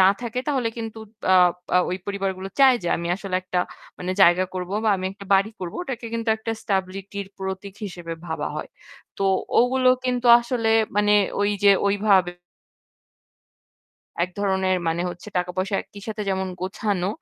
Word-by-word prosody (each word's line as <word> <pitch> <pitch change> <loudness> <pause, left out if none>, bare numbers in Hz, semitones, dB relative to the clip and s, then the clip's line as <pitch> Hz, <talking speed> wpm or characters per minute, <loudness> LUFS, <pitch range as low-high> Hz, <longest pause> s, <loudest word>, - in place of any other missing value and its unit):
না 185 - +7
থাকে 245 +1 -3
তাহলে 260 -5 +1
কিন্তু 225 -1 -6 0.2
তা - - 0 0.5
আ - - +7
ওই 185 - -1
পরিবারগুলো 195 -1 -3
চায় 265 -2 +7
যে 175 - -2
আমি 170 0 -4
আসলে 195 -2 -5
একটা 180 -1 -2 0.4
মানে 180 +1 -2
জায়গা 180 +1 +6
করবো 185 +1 -4
বা - - +3
আমি 185 - -3
একটা 200 0 -12
বাড়ি 195 +3 +3
করবো। 175 -2 -5
ওটাকে 250 -8 -5
কিন্তু 230 0 -3
একটা 225 +1 -4
stability 195 0 -3
র - - -17
প্রতীক 190 0 -5
হিসেবে 175 -4 -6
ভাবা 160 -2 -3
হয়। 155 - -5 0.5
তো - - -1 0.4
ওগুলো 255 +1 +3 0.2
কিন্তু 250 -1 0
আসলে 235 -2 -1 0.3
মানে 210 0 +3 0.3
ঐযে 205 0 +4
ওইভাবে 200 -3 +3 1.9
এক 180 - -9
ধরনের 190 -2 +1
মানে 165 +1 0
হচ্ছে 175 +3 -8
টাকা-পয়সা 180 +2 -2
একই 200 - -14
সাথে 215 -1 -4
যেমন 190 0 -1
গোছানো, 190 0 -1
195 Hz, 160 wpm, -23 LUFS, 185-220 Hz, 1.9 s, না